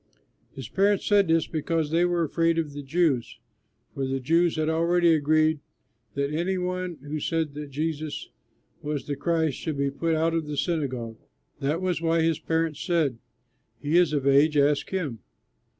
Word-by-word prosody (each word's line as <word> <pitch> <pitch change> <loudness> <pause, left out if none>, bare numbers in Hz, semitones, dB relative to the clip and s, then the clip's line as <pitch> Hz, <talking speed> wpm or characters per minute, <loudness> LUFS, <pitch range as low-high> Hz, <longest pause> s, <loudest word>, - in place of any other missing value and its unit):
His 135 -4 -7
parents 200 +7 +1
said 205 -2 +4
this 165 0 +3
because 160 -1 -2
they 170 +2 +3
were 175 -1 +1
afraid 165 +1 +1
of 155 -3 -2
the 145 - -6
Jews; 140 -4 0 0.6
for 135 -1 -2
the 135 0 -1
Jews 165 +6 +2
had 155 -1 0
already 170 +1 +3
agreed 155 +1 +2 0.6
that 140 +1 -1
any 175 +4 0
one 180 -1 -3
who 150 +1 -4
said 160 -1 -1
that 150 0 -7
Jesus 155 +1 -4 0.5
was 150 -1 -3
the 145 - -3
Christ 160 -1 0
should 155 -3 -3
be 140 0 0
put 165 +3 -1
out 165 +1 +1
of 165 -2 -1
the 150 -1 -4
synagogue. 130 -10 -2 0.4
That 150 +5 -1
was 180 -3 0
why 165 0 +2
his 165 -2 +1
parents 160 -2 -1
said, 155 -10 0 0.6
"He 150 +2 -1
is 175 -3 +5
of 145 -3 -1
age, 145 +2 +4
ask 145 0 +2
him." 155 - -3
160 Hz, 175 wpm, -26 LUFS, 145-170 Hz, 0.6 s, is